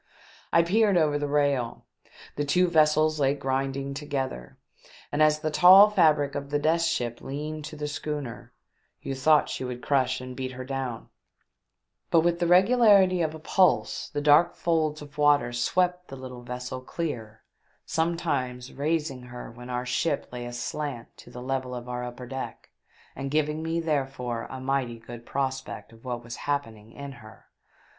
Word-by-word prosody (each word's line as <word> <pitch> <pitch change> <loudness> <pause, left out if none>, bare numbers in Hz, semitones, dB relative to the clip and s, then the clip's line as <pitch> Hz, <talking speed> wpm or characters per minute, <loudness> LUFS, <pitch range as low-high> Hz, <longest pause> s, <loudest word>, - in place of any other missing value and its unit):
I 170 - +5
peered 200 +2 +3
over 150 -3 +2
the 145 - -1
rail. 140 -5 0 0.5
The 145 - -1
two 180 +6 +3
vessels 155 -1 +3
lay 140 0 +2
grinding 135 0 -2
together, 135 - -4 0.5
and 145 - 0
as 155 0 +4
the 155 -1 -1
tall 190 +6 +8
fabric 155 -7 +3
of 140 0 -5
the 145 - +1
Death 160 +3 +2
Ship 120 -8 -1
leaned 150 +2 -5
to 155 - -8
the 150 0 -4
schooner, 145 -4 -5 0.5
you 135 - -3
thought 150 +3 +4
she - - -4
would 125 -1 -5
crush 130 -3 +1
and 130 0 -8
beat 130 0 -4
her 130 0 -7
down, 130 -3 -4 1.0
but 165 - +5
with 170 +1 +1
the 175 - +1
regularity 190 -1 +5
of 160 -1 -1
a - - -9
pulse 185 +4 +2
the 145 - -3
dark 150 +4 +5
folds 155 -3 0
of 145 0 -13
water 145 -5 +4
swept 180 +8 0
the 135 - -8
little 130 -1 -8
vessel 125 +1 -6
clear, 120 -7 -5 0.4
sometimes 140 -7 -2
raising 150 -2 -1
her 125 -1 -9
when 125 +1 -11
our 125 0 -2
ship 140 +4 -1
lay 120 -1 -6
aslant 120 +1 -5
to - - -14
the 125 - -9
level 130 -1 -2
of 120 0 -7
our 125 0 -4
upper 125 +1 -7
deck, 130 +2 -7 0.4
and 135 +1 -4
giving 150 +1 0
me, 165 +1 -1
therefore, 135 -7 -2
a 130 - -6
mighty 130 -3 -1
good 120 +1 -11
prospect 135 -3 -3
of 115 - -18
what 120 -2 -4
was 120 0 -7
happening 115 -7 -3
in 140 +2 -8
her. 110 -4 -14
140 Hz, 170 wpm, -27 LUFS, 125-155 Hz, 1.0 s, tall